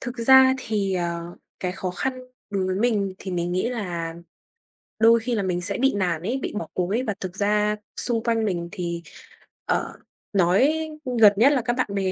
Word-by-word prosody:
thực 245 -1 -6
ra 265 +2 +7
thì, 210 -6 -1
ờ, 170 -1 -3 0.2
cái 180 -1 -2
khó 185 -1 -4
khăn 260 +9 -2 0.4
đối 195 -2 -1
với 185 - -1
mình 205 -3 0
thì 190 - -7
mình 175 0 -2
nghĩ 185 +6 0
là 175 -8 -4 0.9
đôi 230 +1 +6
khi 240 +1 -2
là 205 - -1
mình 180 -1 -1
sẽ 200 +3 +1
bị 270 0 +2
nản 175 -5 0
ấy, 235 +9 -2
bị - - -4
bỏ - - -6
cuộc 180 -1 -1
ấy. 235 +6 0
Và 215 - -2
thực 185 -1 -6
ra 210 +1 +1 0.2
xung 235 -2 +1
quanh 230 -2 +1
mình 175 -4 -2
thì, 170 -2 -4 0.6
ờ, - - -2 0.4
nói 195 - +3 0.4
gần 210 -2 +8
nhất 245 +7 +5
là 260 - +1
các 240 +1 -1
bạn 255 - +1
bè 190 -1 0
200 Hz, 205 wpm, -24 LUFS, 180-230 Hz, 0.9 s, gần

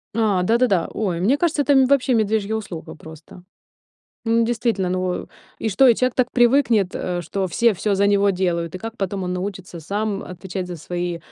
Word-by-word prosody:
А, 210 -5 +2
да-да-да. 225 -3 +2
Ой, 180 -6 -2
мне 250 +10 +3
кажется, 310 -2 +1
это, 285 - +1
м, 265 -1 +5
вообще 270 -1 +2
медвежья 220 -1 +1
услуга 195 -7 -7
просто. 160 +3 -13 0.8
М, 230 0 +3
действительно, 225 -5 0
ну 185 0 -2 0.3
и 225 - -2
что, 260 +7 +5
и 235 - +6
человек 255 -1 0
так 255 -1 +1
привыкнет, 240 -6 +3
э, 180 -1 -3
что 190 +4 -2
все 235 +6 +3
всё 205 +3 -1
за 200 +1 +2
него 200 0 +3
делают, 175 -3 -1
и - - -4
как 225 +3 -7
потом 195 -2 -3
он 180 - -2
научится 185 -2 -5
сам 200 +4 -3
отвечать 185 +1 -6
за 175 - -6
свои 175 +2 -4
200 Hz, 190 wpm, -21 LUFS, 180-230 Hz, 0.8 s, и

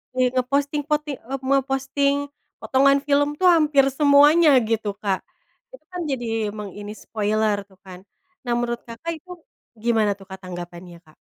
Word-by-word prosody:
kayak 255 -1 +2
ngeposting 280 +3 0
poti 300 0 0
eee, 270 +3 -6
memposting, 275 +1 +1 0.5
potongan 275 +1 +4
film 285 0 +3
tuh 370 - +5
hampir 300 -5 +4
semuanya 295 +3 +6 0.2
gitu 220 -3 -1
Kak, 195 -2 0 0.6
itu - - -23
kan 360 -1 -5
jadi 245 -3 -3 0.3
meng 210 -2 -6
ini 205 0 -7
spoiler 215 -1 -1
tuh 190 -1 -23
kan, 185 -1 -11 0.4
nah 240 - 0
menurut 240 0 -2
Kakak, 235 +9 -6
itu 365 +4 -15 0.5
gimana 220 -2 +1
tuh 195 - -13
Kak, 190 - -8
tanggapannya, 175 -1 -9
Kak? 155 - -22
255 Hz, 155 wpm, -22 LUFS, 205-285 Hz, 0.6 s, semuanya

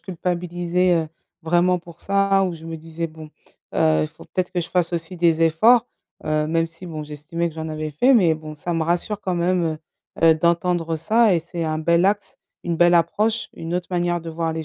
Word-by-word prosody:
culpabilisais, 175 0 -1
heu, - - -12 0.3
vraiment 175 +2 +2
pour 170 -1 -15
ça. 195 0 +2
Où 180 -2 -2
je 160 - -14
me 165 0 -6
disais: 165 +1 -5
«Bon, 155 -1 -12 0.4
heu, 80 0 +3
il 75 - -2
faut - - -16
peut-être 185 -1 -3
que 180 -1 -1
je 165 - -5
fasse 180 -1 0
aussi 170 +2 -4
des 165 -1 +2
efforts», 225 +10 +5 0.4
heu, 155 0 0
même 165 0 +1
si 165 +2 -12
bon, 155 -2 -6
j'estimais 155 +3 -4
que 160 - -12
j'en 160 0 -5
avais 155 -1 -4
fait. 250 - +4
Mais 180 -9 +4
bon 155 -1 -9
ça 175 +3 -3
me 165 - 0
rassure 175 +5 -1
quand 185 -3 -2
même, 175 +1 +1 0.6
heu - - +5
heu, - - +5
d'entendre 170 0 0
ça 215 +6 +3
et - - +3
c'est 170 +1 -6
un 155 -1 -1
bel 170 +2 +2
axe, 205 +1 0 0.3
une 170 -1 -1
belle 175 +1 +5
approche, 210 +7 +1
une 165 +1 -6
autre 180 -1 -4
manière 175 -1 0
de 165 - -8
voir 165 0 -2
les 160 0 -4
170 Hz, 220 wpm, -22 LUFS, 160-180 Hz, 0.6 s, efforts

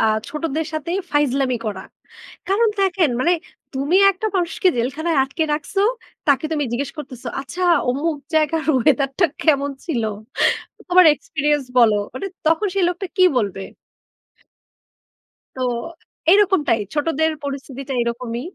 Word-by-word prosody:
আ - - +3 0.2
ছোটদের 310 +1 -3
সাথে 310 +1 -4 0.2
ফাইজলামি 275 -3 +1
করা। 195 -3 -4 0.7
কারণ, 430 +4 +3
দেখেন, 365 -5 +2
মানে 340 +7 +3 0.4
তুমি 280 +7 +1
একটা 390 +3 -4
মানুষকে 355 +1 +1
জেলখানায় 285 +7 -1
আটকে 280 +5 -2
রাখসো, 300 +6 -2 0.5
তাকে 280 +2 +3
তুমি 295 -2 0
জিজ্ঞেস 275 +3 -2
করতেছো, 255 -4 -7
"আচ্ছা, 345 +7 -6 0.3
অমুক 300 +5 -1 0.2
জায়গার 315 +1 +2
ওয়েদারটা 275 +4 +2 0.2
কেমন 285 -2 +2
ছিল? 270 -9 -1 0.9
তোমার 360 -1 +7
এক্সপেরিয়েন্স 295 -1 -1
বলো।" 225 -3 +6 0.2
মানে 260 - -4 0.2
তখন 325 +6 +3
সে 395 - +1
লোকটা 360 +2 -3
কী 370 - +4 0.2
বলবে? 200 -4 -2 2.0
তো - - -6 0.7
এই 380 - +8
রকমটাই। 300 - +1
ছোটদের 315 +1 +1
পরিস্থিতিটা 275 -1 -6
এরকমই। 235 0 -3
295 Hz, 125 wpm, -21 LUFS, 265-335 Hz, 2.0 s, এই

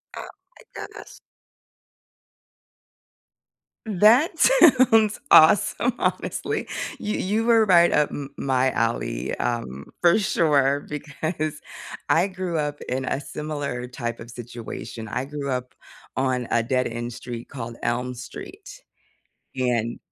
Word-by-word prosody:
Oh - - -6 0.3
my - - -17 0.2
gosh. - - -13 2.7
That 225 - +4
sounds 255 - +5
awesome, 205 +8 +5
honestly. - - -2 0.3
You 210 - -2
you 215 +4 0
were 225 -2 +5
right 175 -3 +5
up 150 -1 +2
m 140 -1 -6
my 130 -1 +1
alley, - - -2
um, 115 - -3
for 175 +4 +5
sure, 145 -7 +2
because 155 +1 -4 0.5
I 170 +4 +3
grew 185 -4 -3
up 145 0 -3
in 130 +1 -2
a 130 - -1
similar 145 -4 -5
type 120 -2 -5
of 115 - -10
situation. 120 -1 -8
I 125 +5 -3
grew 140 0 -5
up 125 -1 -3 0.4
on 130 -2 0
a 115 - +3
dead-end 120 -1 -2
street 120 0 -8
called 115 -3 -7
Elm 125 +2 -1
Street. 125 -1 -10 0.7
And 120 -3 -1
140 Hz, 115 wpm, -24 LUFS, 120-175 Hz, 2.7 s, sounds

